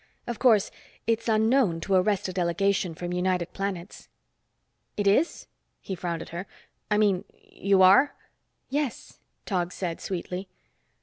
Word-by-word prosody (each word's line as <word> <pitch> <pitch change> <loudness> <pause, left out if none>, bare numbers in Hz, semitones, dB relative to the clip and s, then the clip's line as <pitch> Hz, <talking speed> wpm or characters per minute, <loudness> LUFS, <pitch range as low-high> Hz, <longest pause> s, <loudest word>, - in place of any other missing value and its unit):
Of 240 -2 -5
course, 225 -6 +4 0.3
it's 230 0 0
unknown 220 -4 +3
to 195 - -1
arrest 190 +1 +2
a 185 - -5
delegation 180 0 0
from 175 +2 -4
United 180 -1 0
Planets." 195 -2 -5 0.9
"It 205 - 0
is?" 240 +12 +2 0.3
he 195 - -6
frowned 170 -2 -3
at - - -13
her. 175 +3 -6 0.4
"I 210 - +2
mean, 200 -4 +2 0.3
you 200 - +3
are?" 200 +10 +6 0.5
"Yes," 285 -2 -3 0.3
Tog 180 -4 -1
said 175 -3 -4
sweetly. 185 +1 -4
195 Hz, 135 wpm, -27 LUFS, 180-215 Hz, 0.9 s, are